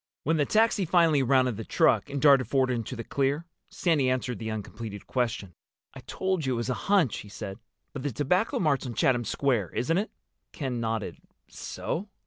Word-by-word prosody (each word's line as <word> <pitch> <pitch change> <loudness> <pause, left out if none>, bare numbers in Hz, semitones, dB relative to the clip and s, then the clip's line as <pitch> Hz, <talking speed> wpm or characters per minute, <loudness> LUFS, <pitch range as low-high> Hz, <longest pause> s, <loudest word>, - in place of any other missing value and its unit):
When 160 +3 +1
the 145 - +1
taxi 220 -2 +3
finally 165 -4 +4
rounded 130 -3 +2
the 110 - -5
truck 110 +2 +2
and 140 0 -3
darted 140 -2 +5
forward 130 -2 +2
into 120 0 -3
the 115 - -5
clear, 140 +6 -1 0.2
Sandy 150 -7 +1
answered 130 -1 -1
the 110 -1 -4
uncompleted 110 -1 -6
question. 115 -7 -2 0.4
"I 135 - -10
told 190 -3 -1
you 130 -2 0
it - - -1
was 120 +2 -2
a 125 - -5
hunch," 190 - +3
he 105 - -10
said. 100 0 -7 0.3
"But 140 - -5
the 145 +1 -2
Tobacco 150 - +1
Mart's 140 -6 +1
on 120 - -6
Chatham 120 0 +2
Square, 120 - 0
isn't 165 +9 +1
it?" 210 - -2 0.4
Ken 130 -5 -3
nodded. 115 -2 -2 0.3
"So?" 200 +5 -5
130 Hz, 190 wpm, -27 LUFS, 115-155 Hz, 0.4 s, darted